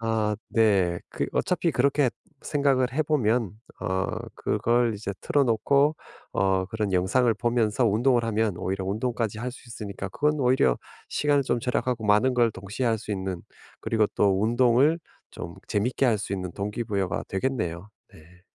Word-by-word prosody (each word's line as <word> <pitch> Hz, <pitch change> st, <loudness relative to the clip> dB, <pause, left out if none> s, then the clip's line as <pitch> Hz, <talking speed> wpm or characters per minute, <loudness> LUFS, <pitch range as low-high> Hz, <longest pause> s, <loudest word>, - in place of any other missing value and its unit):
아 110 Hz, -2 st, 0 dB
네. 95 Hz, -6 st, +3 dB
그 -, -, -2 dB
어차피 175 Hz, -2 st, +1 dB
그렇게 140 Hz, 0 st, +2 dB, 0.3 s
생각을 135 Hz, -4 st, +1 dB
해 155 Hz, -, +2 dB
보면 120 Hz, -, +1 dB, 0.3 s
어 95 Hz, +1 st, -1 dB, 0.3 s
그걸 120 Hz, -1 st, +1 dB
이제 100 Hz, -1 st, -4 dB
틀어 145 Hz, -1 st, +2 dB
놓고 140 Hz, +6 st, +3 dB, 0.4 s
어 95 Hz, -1 st, +1 dB
그런 105 Hz, -1 st, -2 dB
영상을 115 Hz, +7 st, +3 dB
보면서 120 Hz, +1 st, +1 dB
운동을 120 Hz, +3 st, +3 dB
하면 110 Hz, -4 st, 0 dB
오히려 95 Hz, +1 st, -3 dB
운동까지 110 Hz, +1 st, -2 dB
할 125 Hz, +1 st, -4 dB
수 125 Hz, -, -14 dB
있으니까 100 Hz, -3 st, -6 dB
그건 150 Hz, +10 st, +1 dB
오히려 125 Hz, -, +3 dB, 0.3 s
시간을 145 Hz, -1 st, +2 dB
좀 120 Hz, -2 st, -1 dB
절약하고 125 Hz, -2 st, -1 dB
많은 105 Hz, +5 st, +4 dB
걸 120 Hz, -2 st, +3 dB
동시에 105 Hz, +5 st, -4 dB
할 115 Hz, -1 st, +2 dB
수 105 Hz, 0 st, -5 dB
있는 95 Hz, -2 st, -4 dB, 0.4 s
그리고 110 Hz, -2 st, +1 dB
또 100 Hz, 0 st, +2 dB
운동을 125 Hz, +7 st, +3 dB, 0.3 s
좀 85 Hz, -, -8 dB
재밌게 125 Hz, +6 st, +1 dB
할 115 Hz, -3 st, +3 dB
수 100 Hz, -, -5 dB
있는 90 Hz, -2 st, -3 dB
동기부여가 100 Hz, -2 st, -2 dB
되겠네요. 95 Hz, -4 st, -2 dB, 0.2 s
네. 90 Hz, +4 st, -19 dB
110 Hz, 320 characters per minute, -26 LUFS, 100-125 Hz, 0.4 s, 많은